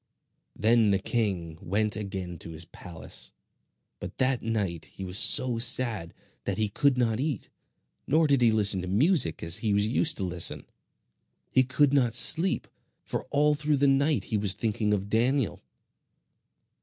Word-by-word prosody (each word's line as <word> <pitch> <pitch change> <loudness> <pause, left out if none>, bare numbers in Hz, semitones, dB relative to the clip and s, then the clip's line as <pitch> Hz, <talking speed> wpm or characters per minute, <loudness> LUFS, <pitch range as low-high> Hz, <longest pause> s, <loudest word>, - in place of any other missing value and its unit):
Then 115 -1 +2
the 100 - +2
king 95 -7 -3
went 105 +3 -1
again 95 -5 -6
to - - -10
his 80 +1 -2
palace; 85 -1 -7 0.7
but - - -9
that 130 -1 +1
night 100 -7 -3
he 95 - -10
was 90 +3 +1
so 120 0 +4
sad 115 -7 +2 0.3
that - - -3
he 110 -1 -1
could 140 +5 +1
not 115 -2 0
eat, 140 -5 -4 0.6
nor 160 +3 +2
did 140 -3 +2
he 115 -2 +4
listen 100 -3 +2
to 90 - -7
music 115 - +2
as 85 +3 +3
he 110 -2 -1
was 100 0 +2
used 145 +7 0
to 100 - -4
listen. 90 -2 -1 0.9
He 130 - +4
could 135 +2 +1
not 125 -5 +1
sleep, 170 +8 +2 0.4
for - - -5
all 150 +2 +1
through 150 0 -1
the 140 - +1
night 140 +2 +2
he 110 - -2
was 100 -2 +4
thinking 105 0 -2
of 100 -1 -1
Daniel. 115 - 0
110 Hz, 165 wpm, -26 LUFS, 95-130 Hz, 0.9 s, so